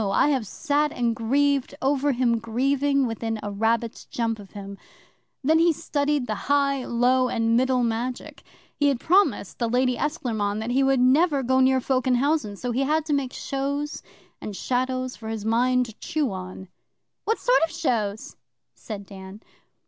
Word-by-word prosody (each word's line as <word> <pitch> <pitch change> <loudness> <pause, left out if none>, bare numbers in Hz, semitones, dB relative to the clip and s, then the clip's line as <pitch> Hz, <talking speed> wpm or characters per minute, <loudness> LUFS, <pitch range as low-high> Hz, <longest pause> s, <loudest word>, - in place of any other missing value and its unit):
I 195 - +3
have 260 -7 0
sat 295 - 0
and 235 -2 -1
grieved 275 +4 +1
over 285 +1 +1
him 240 -2 +1
grieving 275 +4 +1
within 225 -1 -3
a 205 - -4
rabbit's 225 +3 -1
jump 225 -2 -2
of 200 -2 -13
him. 200 -1 -8 0.6
Then 315 +4 +4
he 335 +1 +5
studied 295 -3 -1
the 220 - -2 0.2
High, 280 -2 +2
Low, 250 +2 +2
and 230 0 +1
Middle 255 0 +2
Magic. 240 +2 -3 0.3
He 290 - +2
had 275 -4 +1
promised 385 +8 +2
the 235 -2 0
Lady 250 +1 +1
Esclairmonde 225 -8 -2
he 265 +2 +2
would 270 -1 +3
never 275 +3 +3
go 260 +1 +2
near 260 0 +4
folk 260 0 0
in 255 - +4
housen; 270 -5 0
so 245 +4 -4
he 250 +3 0
had 305 +3 +1
to 305 - -1
make 275 -3 0
shows 280 +2 -3 0.4
and 210 - -6
shadows 255 +2 -2
for 220 -1 -8
his 220 -2 -4
mind 250 +3 +2
to 225 - -10
chew 295 -6 -1
on.' 185 0 -8 0.6
'What 445 - +1
sort - - +3
of 330 - +1
shows?' 235 -11 -2 0.4
said 205 -3 -8
Dan. 190 0 -11
255 Hz, 170 wpm, -24 LUFS, 225-280 Hz, 0.6 s, he